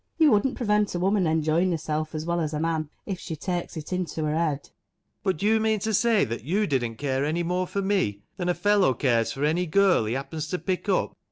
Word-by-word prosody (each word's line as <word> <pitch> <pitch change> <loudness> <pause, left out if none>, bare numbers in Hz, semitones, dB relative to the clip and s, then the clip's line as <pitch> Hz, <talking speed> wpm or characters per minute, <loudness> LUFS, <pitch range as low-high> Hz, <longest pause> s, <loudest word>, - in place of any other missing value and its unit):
You 315 -3 +5
wouldn't 220 +5 +2
prevent 210 -4 +1
a - - -1
woman 190 0 +2
enjoying 160 +3 +2
herself 155 -2 -2
as 155 0 -3
well 170 0 0
as 155 -1 -2
a - - -1
man, 160 -1 -1 0.2
if 190 -3 -4
she 165 - -5
takes 175 +2 -4
it 155 +3 -5
into 170 -3 -2
her 150 - 0
head? 155 -3 0
ALAN. - - -21 0.5
But 190 -4 0
do 200 - -3
you 220 +1 +4
mean 220 0 +2
to 220 +2 -1
say 225 0 +3
that 115 0 -5
you 195 - +1
didn't 120 - -1
care 135 +1 -1
any 160 +4 0
more 180 +2 -1
for 200 +2 -2
me 110 - 0
than 180 -2 -2
a 175 - +2
fellow 205 -10 +3
cares 115 -3 +1
for 140 +2 -2
any 175 +4 +1
girl 190 - +3
he 110 +3 -1
happens 150 +3 -4
to 180 - -2
pick 185 +2 -3
up 190 - 0
170 Hz, 245 wpm, -26 LUFS, 150-195 Hz, 0.5 s, You